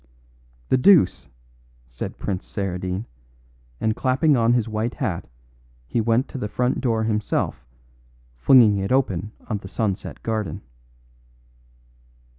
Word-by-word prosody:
"The - - +4
deuce!" 170 - +4 0.6
said - - -7
Prince 95 -2 -4
Saradine, 95 0 -3 0.7
and 110 0 0
clapping 135 +3 +2
on 115 -1 +3
his 120 -3 +1
white 110 +2 -2
hat 105 - -3 0.6
he 70 - -1
went 115 +4 +1
to 135 - -6
the 105 - -2
front 125 +4 -1
door 115 -4 +1
himself, 105 - -1 0.7
flinging 110 - +6
it 95 +3 -2
open 105 -7 0 0.2
on 105 -3 -2
the 95 - -10
sunset 100 -1 -3
garden. 110 -8 -3
110 Hz, 120 wpm, -23 LUFS, 95-125 Hz, 0.7 s, flinging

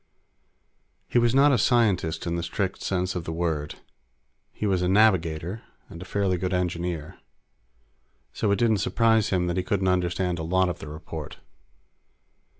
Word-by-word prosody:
He 120 - +2
was 120 +1 +2
not 140 +2 +6
a 125 - +3
scientist 105 -9 +1
in 85 0 -1
the 85 - -2
strict 95 +3 -3
sense 90 0 -1
of 90 - -4
the 80 - -5
word. 80 -3 -2 0.8
He - - -5
was 95 -3 +1
a 90 - +1
navigator 95 -2 +2 0.3
and 85 - -10
a - - -7
fairly 95 -1 0
good 90 +1 -1
engineer. 85 -3 -3 1.1
So 105 - -1
it 100 - +2
didn't 115 -3 +3
surprise 110 +1 +2
him 90 -2 +1
any - - -1
that 85 - -2
he 90 - 0
couldn't 95 0 0
understand 90 -1 0
a - - -3
lot 95 +2 +2
of 85 - -5
the - - -8
report. 80 0 -8
90 Hz, 170 wpm, -25 LUFS, 85-100 Hz, 1.1 s, not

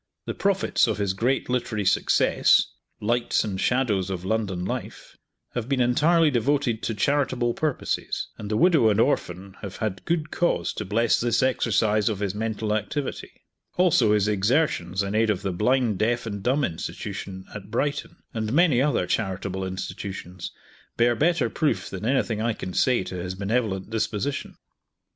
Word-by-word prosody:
The - - -3
profits 195 -8 +2
of 110 - -1
his 100 -2 0
great 125 +7 0
literary 120 -4 -1
success, 95 - +4 0.3
"Lights 120 +3 +1
and 95 -3 -3
Shadows 110 -7 +1
of 95 -1 -4
London 95 -4 -1
Life," - - -6 0.4
have 120 0 -3
been 135 -2 +1
entirely 150 +6 +4
devoted 125 -2 +1
to 115 - -2
charitable 130 -1 +1
purposes, 155 0 -2
and 105 - -7
the 105 - 0
widow 155 -5 +5
and 105 0 +2
orphan 95 -7 -1
have 100 -3 -7
had 95 -5 -3
good 155 -2 -1
cause 175 - 0
to 110 - -5
bless 115 +4 +2
this 120 +1 +1
exercise 110 -4 +2
of 105 - -2
his 100 -1 -2
mental 110 0 -2
activity; 110 +7 -4 0.3
also 160 -12 +4
his 105 -1 +2
exertions 105 - +1
in 100 +1 -3
aid 110 +1 +2
of 100 -3 0
the 95 - -1
Blind, 110 +2 +1
Deaf, 120 +2 +1
and 100 -3 -4
Dumb 135 +7 +1
Institution, 95 +1 -5
at 100 -1 -8
Brighton, 145 +5 -2
and 110 -1 -2
many 150 -4 +4
other 135 -10 +1
charitable 95 -1 -2
institutions, 95 -1 -6 0.5
bear 120 0 +3
better 170 +7 +2
proof 115 - -1
than 100 +3 -4
anything 120 -5 +1
I 115 0 +1
can 90 -3 -6
say 125 -2 +2
to 90 - -6
his 90 +1 -4
benevolent 100 -1 -1
disposition. 115 +4 -2
110 Hz, 160 wpm, -25 LUFS, 100-130 Hz, 0.5 s, widow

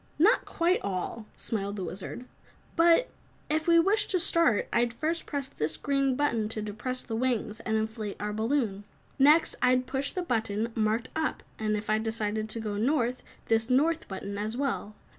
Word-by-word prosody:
"Not 410 +10 +4
quite 345 +2 +1
all," 200 +3 -4
smiled 200 -2 -3
the 195 - -4
Wizard, 190 +7 -6 0.5
"but 340 +8 +4 0.4
if 315 +1 0
we 335 0 +6
wished 400 +5 +3
to 370 - +3
start, 330 -9 +4
I'd 235 0 +1
first 325 +5 -2
press 280 -3 -3
this 155 - -2
green 275 -2 +1
button 235 -7 0
to 220 -1 -3
depress 215 +5 -4
the 225 - -4
wings 230 -3 -1
and 220 -1 -1
inflate 220 -1 -3
our 210 0 -3
balloon. 220 -3 -1 0.4
Next, 300 +4 +5
I'd 255 0 +3
push 270 +2 -2
the 365 - -3
button 225 -5 -1
marked 220 +2 0
'up' 315 -1 -2 0.2
and, 215 -1 0
if 210 - -6
I 215 0 +2
decided 220 -1 0
to 230 - -2
go 210 -2 -3
North, 250 +1 +1 0.2
this 225 +1 +1
'North' 315 +6 +2
button, 200 +1 -5
as 215 +3 -3
well. 255 -6 -2
230 Hz, 180 wpm, -28 LUFS, 215-285 Hz, 0.5 s, we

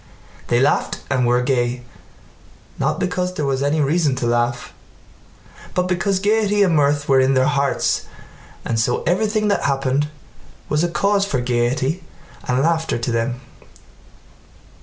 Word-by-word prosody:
They 120 - +2
laughed 140 +3 +1
and 125 -3 +2
were 125 +1 +2
gay 125 -1 0 1.0
not - - 0
because 180 0 -2
there 150 - -2
was 135 -1 -1
any 145 +2 +1
reason 145 -1 +1
to 125 - -3
laugh, 120 +1 -1 1.0
but 180 0 +1
because 185 +2 0
gaiety 205 0 +2
and 175 -4 +2
mirth 145 -1 +2
were 135 -1 +4
in 130 +1 +3
their 130 0 +3
hearts 140 -1 0 0.6
and 115 - -1
so 120 +2 0
everything 210 +4 +1
that 200 - 0
happened 135 +1 0 0.6
was 150 +2 +1
a 175 - +1
cause 200 +5 +1
for 135 - -1
gaiety 125 +7 -1 0.4
and 125 +2 +1
laughter 160 -2 0
to 120 +1 -3
them. 115 +2 -2
140 Hz, 145 wpm, -20 LUFS, 125-180 Hz, 1.0 s, were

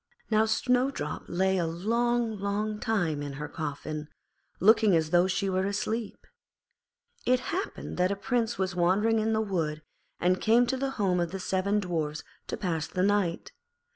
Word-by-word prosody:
Now 215 +1 +4
Snowdrop 250 +4 0
lay 190 +2 +1
a 170 - 0
long, 230 +5 0
long 210 +2 -2
time 175 -11 0
in 145 -1 -5
her 150 +2 -5
coffin, 155 0 -5 0.5
looking 215 -1 +5
as 160 -1 +1
though 175 +1 +5
she 195 +1 0
were 190 0 0
asleep. 215 +2 -3 1.0
It 250 0 +4
happened 375 +4 -4
that 180 +1 +3
a - - 0
Prince 235 +2 -1
was 185 -1 -1
wandering 200 +6 +3
in 220 +1 +1
the 220 - +2
wood, 160 -7 -2 0.4
and 180 +1 +2
came 235 +3 +5
to 255 - -1
the 270 +1 -1
home 190 -4 +2
of 170 -1 0
the 195 - -5
seven 190 +3 0
Dwarfs 160 -5 -2 0.2
to - - -3
pass 165 -4 -2
the 185 - -1
night. 195 -4 +1
195 Hz, 170 wpm, -28 LUFS, 175-220 Hz, 1.0 s, looking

